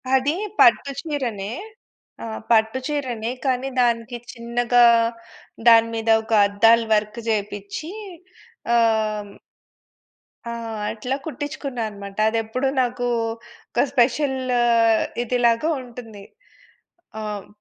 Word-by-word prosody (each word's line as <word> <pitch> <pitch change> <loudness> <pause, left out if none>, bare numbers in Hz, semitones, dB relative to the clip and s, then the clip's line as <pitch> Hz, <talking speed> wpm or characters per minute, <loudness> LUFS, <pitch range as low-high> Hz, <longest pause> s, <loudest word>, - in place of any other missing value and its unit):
అదీ 280 +4 +1 0.2
పట్టు 235 +4 +5
చీరనే. 240 -10 -3 0.7
ఆహ్, 220 -1 -5
పట్టు 220 +3 +3
చీరనే, 250 -6 -3
కానీ 260 0 0
దానికి 235 0 0
చిన్నగా, 240 0 +2 0.8
దాని 230 0 +7
మీద 225 0 -2
ఒక 220 - -4
అద్దాలు 225 +3 +4
వర్క్ 210 +2 0
జేపిచ్చీ 205 - -3 0.8
ఆహ్ 215 -3 +1 1.1
ఆ! 235 - -4 0.4
అట్లా 250 +4 -3
కుట్టించుకున్నా 285 -4 -5
అనమాట. 200 -1 -10
అది 230 - -1
ఎప్పుడు 255 +5 -2
నాకూ, 245 0 -1 0.6
ఒక - - +2
స్పెషల్ల్ 260 0 +1 0.7
ఇదిలాగా 240 +4 +1
ఉంటుంది. 230 -5 -11 1.0
ఆహ్ 210 -2 -5
235 Hz, 95 wpm, -22 LUFS, 220-255 Hz, 1.1 s, దాని